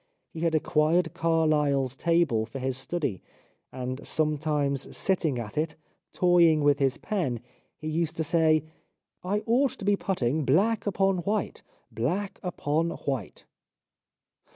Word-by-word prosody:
He 160 - -8
had 165 -1 +1
acquired 160 +2 +2
Carlyle's 150 -5 +1
table 160 -9 +1
for 115 - -7
his 130 0 -2
study, 135 - -3 0.5
and 130 +1 -5
sometimes 150 -3 0
sitting 165 -8 +1
at 115 +3 -4
it, 155 0 -2 0.4
toying 170 -4 +4
with 145 0 +3
his 135 -2 +1
pen, 160 - -2 0.4
he 155 - -7
used 160 +1 -1
to 160 - 0
say: 160 -1 +3 0.6
"I 205 +3 -1
ought 250 +4 +2
to 200 - -8
be 205 0 +4
putting 155 -7 -1
black 205 - +2
upon 195 -1 +2
white, 205 +3 -2 0.3
black 165 - -2
upon 165 -2 -1
white." 135 - -5
155 Hz, 130 wpm, -27 LUFS, 140-175 Hz, 0.6 s, toying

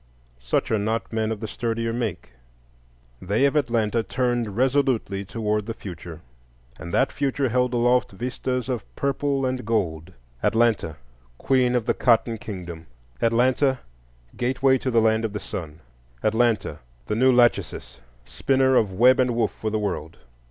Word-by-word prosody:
Such - - -1
are 110 - +2
not 110 +3 -2
men 110 0 0
of 110 -1 -4
the 110 - -3
sturdier 115 +1 -2
make; 110 - -4 0.9
they 105 +8 +1
of 140 - +1
Atlanta 115 -5 +1
turned 120 -3 -1
resolutely 130 -6 +1
toward 105 0 -2
the 115 - -4
future; 85 -5 -9 0.6
and 85 - -7
that 135 - +2
future 140 -2 -1
held 125 +1 +1
aloft 120 +1 +2
vistas 125 +3 -3
of 125 -3 -2
purple 140 0 0
and 130 0 -2
gold:—Atlanta, 85 - -1 0.4
Queen 125 - +2
of 120 -3 0
the - - +2
cotton 115 -2 +2
kingdom; 85 -6 -8 0.3
Atlanta, 125 +3 +2 0.5
Gateway 130 +1 +2
to 130 - -2
the 115 -2 +3
Land 110 0 +2
of 110 -2 -2
the 105 - -3
Sun; 80 -5 -7 0.4
Atlanta, 110 -8 +1 0.3
the 105 - -2
new 130 +3 +4
Lachesis, 120 -1 +1 0.3
spinner 130 - +2
of 105 -5 +3
web 125 +7 +5
and 125 -2 +2
woof 115 - +1
for 110 - -4
the 110 - -1
world. 95 -7 -4
115 Hz, 150 wpm, -24 LUFS, 105-125 Hz, 0.9 s, web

